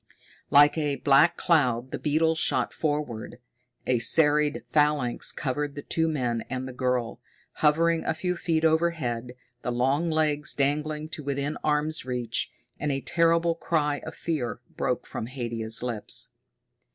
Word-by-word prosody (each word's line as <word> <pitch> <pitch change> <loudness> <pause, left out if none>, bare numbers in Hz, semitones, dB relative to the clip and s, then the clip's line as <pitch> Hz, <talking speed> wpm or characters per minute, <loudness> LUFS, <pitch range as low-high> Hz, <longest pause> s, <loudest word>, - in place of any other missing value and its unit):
Like 145 +2 +6
a 145 -2 0
black 140 +5 +4
cloud 130 -7 +2
the - - -4
beetles 160 +2 +1
shot - - +1
forward. 145 -8 -3 0.5
A 125 -2 +2
serried 150 +4 +3
phalanx 150 -5 +1
covered 145 +1 -3
the 145 - -6
two 165 0 0
men 125 -7 -1
and 130 0 -3
the 130 - -7
girl, 125 -2 -1 0.4
hovering 165 +2 +3
a 160 - -1
few 180 +2 -2
feet 165 -2 0
overhead, 155 -8 0 0.3
the 125 - -2
long 135 +7 +1
legs 155 -2 0
dangling 150 +2 0
to 160 -2 -6
within 140 +1 -2
arm's 155 +1 0
reach. 125 -3 -2 0.3
And 150 0 -1
a 135 0 -2
terrible 170 +1 +2
cry 150 -3 0
of 160 - -9
fear 140 -9 -3 0.2
broke - - -1
from 110 - -5
Haidia's 115 -3 -2
lips. 120 -4 -1
145 Hz, 145 wpm, -26 LUFS, 125-160 Hz, 0.5 s, Like